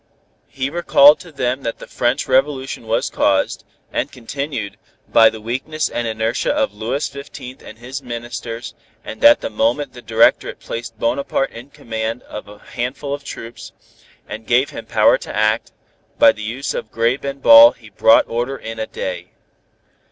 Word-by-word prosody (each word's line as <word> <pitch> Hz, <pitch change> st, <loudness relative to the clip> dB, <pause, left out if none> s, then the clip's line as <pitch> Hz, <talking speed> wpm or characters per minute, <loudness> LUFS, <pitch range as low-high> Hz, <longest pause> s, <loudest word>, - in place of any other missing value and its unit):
He 135 Hz, +1 st, -4 dB
recalled 150 Hz, -3 st, +6 dB
to 175 Hz, -, -12 dB
them 130 Hz, -2 st, -2 dB
that 115 Hz, -3 st, -4 dB
the -, -, -10 dB
French 125 Hz, +5 st, -1 dB
Revolution 135 Hz, -2 st, 0 dB
was 110 Hz, -, 0 dB
caused, 95 Hz, -1 st, +1 dB, 0.3 s
and -, -, -2 dB
continued, 120 Hz, -5 st, -5 dB, 0.3 s
by 115 Hz, -1 st, +6 dB
the 110 Hz, -, -9 dB
weakness 130 Hz, +8 st, -3 dB
and 120 Hz, -1 st, -3 dB
inertia 110 Hz, +1 st, -1 dB
of -, -, 0 dB
Louis 115 Hz, +7 st, -2 dB
Fifteenth 140 Hz, -2 st, -10 dB
and 110 Hz, -, -12 dB
his 125 Hz, +4 st, -7 dB
ministers 120 Hz, -1 st, -6 dB, 0.3 s
and -, -, -8 dB
that 290 Hz, 0 st, +7 dB
the -, -, -3 dB
moment 150 Hz, -, 0 dB
the 120 Hz, -, -11 dB
Directorate 115 Hz, 0 st, +2 dB
placed 115 Hz, -1 st, -7 dB
Bonaparte 130 Hz, +4 st, -1 dB
in 120 Hz, +4 st, -11 dB
command 115 Hz, -4 st, -5 dB
of 105 Hz, -, -9 dB
a 105 Hz, 0 st, -13 dB
handful 125 Hz, +6 st, -5 dB
of 140 Hz, 0 st, -5 dB
troops, 115 Hz, -3 st, -9 dB, 0.5 s
and 110 Hz, +1 st, -8 dB
gave 125 Hz, +3 st, +2 dB
him -, -, -9 dB
power -, -, +4 dB
to -, -, -8 dB
act, 110 Hz, +1 st, +1 dB, 0.5 s
by -, -, +7 dB
the 110 Hz, -, -11 dB
use 115 Hz, +6 st, -4 dB
of 110 Hz, -, -6 dB
grape 115 Hz, +4 st, 0 dB
and 140 Hz, 0 st, -4 dB
ball 290 Hz, +1 st, +9 dB
he -, -, -17 dB
brought 290 Hz, +1 st, +4 dB
order 120 Hz, +4 st, -3 dB
in 115 Hz, 0 st, -8 dB
a 110 Hz, -, -3 dB
day. 90 Hz, -1 st, -5 dB
120 Hz, 170 wpm, -19 LUFS, 115-140 Hz, 0.5 s, ball